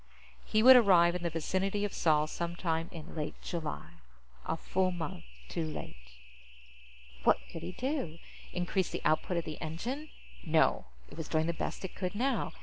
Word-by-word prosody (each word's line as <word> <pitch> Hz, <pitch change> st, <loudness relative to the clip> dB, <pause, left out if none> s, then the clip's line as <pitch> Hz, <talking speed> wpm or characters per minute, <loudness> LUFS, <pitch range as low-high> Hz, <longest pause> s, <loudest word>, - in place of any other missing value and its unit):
He 215 Hz, 0 st, +2 dB
would 260 Hz, +1 st, +11 dB
arrive 180 Hz, -7 st, +6 dB
in 180 Hz, -, -3 dB
the 170 Hz, -, 0 dB
vicinity 190 Hz, +5 st, -1 dB
of 205 Hz, -, -4 dB
Sol 155 Hz, -2 st, +3 dB
some 170 Hz, +2 st, -4 dB
time 165 Hz, -1 st, -1 dB
in 165 Hz, -2 st, -9 dB
late 150 Hz, -2 st, -4 dB
July 150 Hz, -, -4 dB, 0.6 s
a 165 Hz, -, 0 dB
full 185 Hz, +3 st, +1 dB
month 160 Hz, -, -5 dB, 0.2 s
too 165 Hz, -, -2 dB
late. 60 Hz, -, -7 dB, 1.1 s
What -, -, +5 dB
could 165 Hz, -, -6 dB
he 175 Hz, +2 st, -5 dB
do? 255 Hz, -, -2 dB, 0.3 s
Increase 180 Hz, +1 st, 0 dB
the -, -, -5 dB
output 165 Hz, +3 st, +2 dB
of 170 Hz, -, -1 dB
the 155 Hz, -, -6 dB
engine? 235 Hz, -, -4 dB, 0.3 s
No. -, -, +3 dB, 0.3 s
It -, -, -11 dB
was 160 Hz, -, -4 dB
doing 160 Hz, 0 st, +1 dB
the 170 Hz, -, 0 dB
best 170 Hz, -, -4 dB
it 190 Hz, -, -7 dB
could 185 Hz, 0 st, -3 dB
now. 265 Hz, +5 st, 0 dB
170 Hz, 175 wpm, -32 LUFS, 160-190 Hz, 1.1 s, would